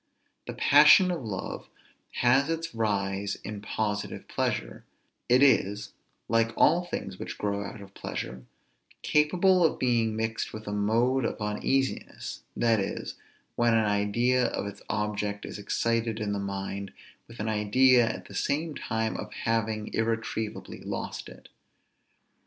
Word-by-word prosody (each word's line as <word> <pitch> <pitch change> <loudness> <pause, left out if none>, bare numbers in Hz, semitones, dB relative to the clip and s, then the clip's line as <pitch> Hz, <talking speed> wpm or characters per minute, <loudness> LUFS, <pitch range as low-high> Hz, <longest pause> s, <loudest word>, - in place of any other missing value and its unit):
The - - -4
passion 150 +6 +7
of 170 -7 -3
love 100 -4 -5 0.6
has 135 +5 +4
its 165 -2 -3
rise 100 -2 -1
in 105 +1 -6
positive 105 -1 -3
pleasure; - - -2 0.5
it 125 +3 +6
is, 105 -6 +2 0.3
like 115 0 +2
all 170 +3 +5
things 95 - -5
which - - -6
grow 100 -1 -1
out 105 - -8
of 100 -1 -13
pleasure, 65 -8 -6 0.6
capable 180 +5 +3
of 160 - +3
being 115 -3 +1
mixed 110 0 -2
with 110 0 -7
a - - -2
mode 115 +6 +2
of - - -2
uneasiness, 120 +6 -2 0.2
that 115 -2 +3
is, 95 - -3 0.4
when 120 -1 +3
an 110 -1 +3
idea 110 +5 +2
of - - -3
its 100 0 -7
object 105 -1 -2
is - - -7
excited 115 +2 0
in 105 -1 -2
the 100 - -2
mind 100 0 -4 0.4
with 115 - -13
an 105 - -2
idea 115 +3 +4
at - - -6
the - - -12
same 155 +2 -1
time 110 -4 -2
of - - -6
having 110 -1 -1
irretrievably 110 -1 -2
lost - - -5
it. - - -14
110 Hz, 145 wpm, -28 LUFS, 105-125 Hz, 0.6 s, passion